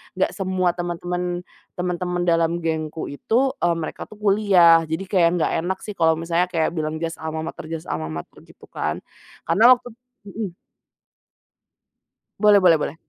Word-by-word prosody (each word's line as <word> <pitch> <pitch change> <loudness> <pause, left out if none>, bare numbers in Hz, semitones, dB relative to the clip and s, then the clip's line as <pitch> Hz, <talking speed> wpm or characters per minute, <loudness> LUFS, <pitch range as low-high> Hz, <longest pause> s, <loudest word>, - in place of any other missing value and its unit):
nggak 190 - +1
semua 185 -2 0
teman-teman 175 0 -3 0.3
teman-teman 180 0 -2
dalam 170 0 +1
gengku 160 -1 -3
itu, 240 - +1
e 175 - +1
mereka 165 -1 -5
tuh - - -14
kuliah, 190 -5 +5
jadi 160 +4 -3
kayak 175 -4 +4
nggak - - +1
enak 190 +1 -1
sih 210 - -6
kalau 160 -1 +4
misalnya 165 +2 0
kayak 165 -3 0
bilang 155 -2 -3
jas 165 0 -3
almamater 160 0 -5
jas 160 0 -6
almamater 80 0 -6
gitu - - -18
kan, 75 - -3 0.4
karena 220 +10 +6
waktu 245 0 -5 0.4
mhm. 200 -3 -5 1.9
Boleh 210 -1 +6
boleh 175 -3 +6
boleh. - - -3
175 Hz, 145 wpm, -22 LUFS, 160-185 Hz, 1.9 s, karena